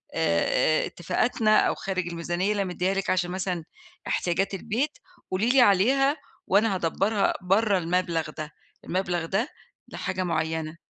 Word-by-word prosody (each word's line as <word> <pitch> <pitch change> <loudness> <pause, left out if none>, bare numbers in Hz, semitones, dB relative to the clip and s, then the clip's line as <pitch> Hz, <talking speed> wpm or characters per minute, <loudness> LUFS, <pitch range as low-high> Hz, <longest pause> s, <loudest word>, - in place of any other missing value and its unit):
آآ، 125 - +2
اتفاقاتنا، 215 +5 +1
أو - - +2
خارج 185 -2 -3
الميزانية 175 +3 -1
اللي 205 -1 0
أنا 190 - -4
مدّيها 185 +2 0
لِك 195 0 -2
عشان 180 -1 +1
مثلًا 180 -2 -2 0.4
احتياجات 190 +3 0
البيت، 230 - -2 0.3
قُولي 195 +5 +1
لي 260 +1 +5
عليها، 260 +8 +4 0.3
وأنا 205 +1 +3
هادبّرها 195 +4 +1
برّه 200 +3 +2
المبلغ 170 -2 -1
ده، 155 0 -5 0.3
المبلغ 175 -2 -1
ده 205 - -1 0.4
لحاجة 185 0 -3
معّينة. 160 -1 -2
185 Hz, 135 wpm, -26 LUFS, 170-205 Hz, 0.4 s, لي